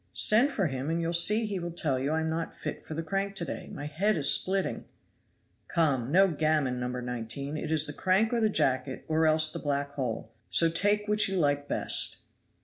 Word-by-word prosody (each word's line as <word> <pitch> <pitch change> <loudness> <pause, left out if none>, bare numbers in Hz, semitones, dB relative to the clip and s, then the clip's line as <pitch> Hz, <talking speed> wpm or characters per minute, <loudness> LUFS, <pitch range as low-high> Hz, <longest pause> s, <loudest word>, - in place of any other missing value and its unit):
Send 240 +7 +3
for 200 -8 -1
him, 135 -1 -3
and 165 +1 -1
you'll 170 0 -2
see 210 +6 +5
he 200 -3 -3
will 175 0 -5
tell 155 -6 -1
you 135 +3 -2
I 160 0 0
am 160 - -2
not 165 0 -4
fit - - -6
for 155 - -8
the 165 - -3
crank 195 +4 -3
to 175 - -3
day; - - -7
my 145 - -7
head 180 +7 0
is 145 - +3
splitting." 190 +1 -2 0.8
"Come, 140 -7 0
no 195 +4 +5
gammon, 150 -5 0
No. 125 - -3
19; 125 +3 -5
it 155 - -5
is 155 -1 +2
the 145 - -3
crank 195 +8 +1
or 235 - +1
the 220 - +3
jacket, 130 -7 0
or 160 0 +2
else 155 0 +4
the - - -4
black 140 -1 -2
hole. 120 -5 -4 0.2
So 165 - +4
take 205 +4 +2
which 210 -1 +3
you 195 - -2
like 145 -3 0
best." - - +1
160 Hz, 220 wpm, -28 LUFS, 140-190 Hz, 0.8 s, see